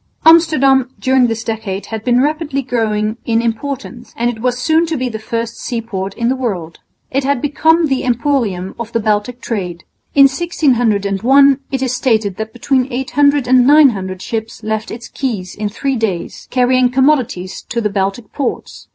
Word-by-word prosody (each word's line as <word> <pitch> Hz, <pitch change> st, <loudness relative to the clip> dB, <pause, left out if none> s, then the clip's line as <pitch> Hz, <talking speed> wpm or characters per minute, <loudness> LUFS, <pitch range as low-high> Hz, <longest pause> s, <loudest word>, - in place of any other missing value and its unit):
Amsterdam 300 Hz, -6 st, +5 dB
during 260 Hz, -1 st, +3 dB
this 225 Hz, -1 st, -3 dB
decade 215 Hz, -4 st, -4 dB
had 220 Hz, -1 st, -4 dB
been 245 Hz, +1 st, +3 dB
rapidly 295 Hz, -2 st, -1 dB
growing 220 Hz, -3 st, -1 dB
in 230 Hz, -1 st, +1 dB
importance 240 Hz, +1 st, -4 dB
and 240 Hz, +1 st, +1 dB
it 220 Hz, -2 st, -10 dB
was 250 Hz, 0 st, 0 dB
soon 320 Hz, +5 st, +2 dB
to 320 Hz, -1 st, -2 dB
be 255 Hz, -1 st, -2 dB
the 220 Hz, -2 st, -6 dB
first 230 Hz, +1 st, -4 dB
seaport 220 Hz, -5 st, -4 dB
in 235 Hz, -, -1 dB
the 260 Hz, -, +1 dB
world. 185 Hz, -11 st, -4 dB, 0.3 s
It 275 Hz, +1 st, 0 dB
had 280 Hz, -1 st, +1 dB
become 320 Hz, +4 st, +2 dB
the 270 Hz, -3 st, -1 dB
emporium 240 Hz, -7 st, -1 dB
of 230 Hz, -1 st, -5 dB
the 230 Hz, -, +1 dB
Baltic 215 Hz, +3 st, -1 dB
trade. 180 Hz, -7 st, -4 dB, 0.3 s
In 280 Hz, -, +7 dB
1601 265 Hz, -, +3 dB
it 265 Hz, -1 st, -2 dB
is 255 Hz, -1 st, -1 dB
stated 220 Hz, -6 st, 0 dB
that 220 Hz, 0 st, -5 dB
between 260 Hz, +2 st, 0 dB
800 280 Hz, +2 st, +1 dB
and 250 Hz, 0 st, +5 dB
900 210 Hz, -11 st, +3 dB
ships 225 Hz, 0 st, -5 dB
left 220 Hz, +1 st, -3 dB
its 235 Hz, +1 st, -8 dB
quays 210 Hz, -9 st, -4 dB
in 210 Hz, 0 st, -3 dB
three 270 Hz, +5 st, -2 dB
days, 205 Hz, -6 st, -3 dB
carrying 255 Hz, 0 st, +3 dB
commodities 255 Hz, -8 st, 0 dB
to 240 Hz, -, -1 dB
the 210 Hz, -3 st, -1 dB
Baltic 200 Hz, +2 st, -3 dB
ports. 280 Hz, -, -4 dB
240 Hz, 170 wpm, -16 LUFS, 220-270 Hz, 0.3 s, In